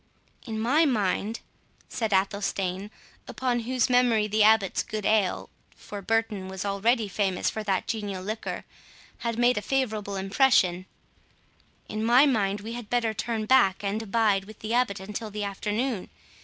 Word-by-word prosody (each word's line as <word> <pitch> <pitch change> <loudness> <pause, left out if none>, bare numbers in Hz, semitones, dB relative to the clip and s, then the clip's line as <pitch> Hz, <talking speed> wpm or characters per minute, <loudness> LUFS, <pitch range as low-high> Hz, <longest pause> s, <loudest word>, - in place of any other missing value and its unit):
"In 220 -1 -3
my 270 +9 +3
mind," 220 - 0 0.5
said 225 -3 -3
Athelstane, 195 0 -1 0.4
upon 250 -2 -1
whose 245 +1 0
memory 245 -4 +3
the 215 +1 +1
Abbot's 215 -2 +4
good 215 -1 -5
ale 210 -4 +1 0.3
(for 205 -1 -8
Burton 215 -2 -1
was 190 +1 -5
already 215 +3 +1
famous 190 -1 0
for 220 - -4
that 195 -2 0
genial 205 -4 -4
liquor) 215 +3 -5 0.5
had 230 -1 -3
made 240 -1 +3
a - - -8
favourable 215 -4 -1
impression,—"in 195 0 -2
my 245 +5 +6
mind 205 -7 +1
we 225 +3 -6
had 240 -3 -7
better 235 -2 +1
turn 220 0 -2
back, 205 -6 +4
and 205 +2 -1
abide 210 -2 +1
with 215 +1 -12
the 220 +1 -3
Abbot 240 -6 +1
until 210 +3 -6
the 210 0 -4
afternoon. 210 +3 -2
215 Hz, 150 wpm, -26 LUFS, 200-230 Hz, 0.5 s, my